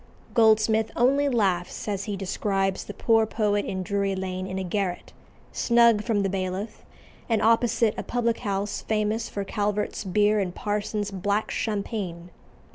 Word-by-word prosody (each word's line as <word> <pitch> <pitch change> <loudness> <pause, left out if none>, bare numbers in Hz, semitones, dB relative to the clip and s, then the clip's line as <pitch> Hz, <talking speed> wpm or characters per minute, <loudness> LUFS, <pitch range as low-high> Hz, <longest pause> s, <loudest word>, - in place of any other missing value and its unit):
Goldsmith 220 -1 +4
only 275 +4 +3
laughs 190 -9 0
as 200 -2 -2
he 205 -2 -3
describes 195 0 -1
the 205 - -7
poor 225 -1 +3
poet 210 -2 0
in 185 -1 -3
Drury 200 0 -1
Lane 185 0 -4
in 190 0 -4
a 190 - -2
garret, 185 -1 -3 0.4
snug 235 -3 +4
from 215 -4 +1
the - - +1
Bailiff, 190 +3 -4 0.5
and 225 -2 +2
opposite 230 -1 +3
a - - -1
public 235 -1 0
house 200 -1 -2
famous 220 +1 -1
for 200 - -3
Calvert's 210 +1 -2
beer 210 +2 +2
and 180 -3 -2
Parsons's 205 0 -2
"black 200 +3 -1
champagne." 200 -5 -3
205 Hz, 150 wpm, -26 LUFS, 195-220 Hz, 0.5 s, Goldsmith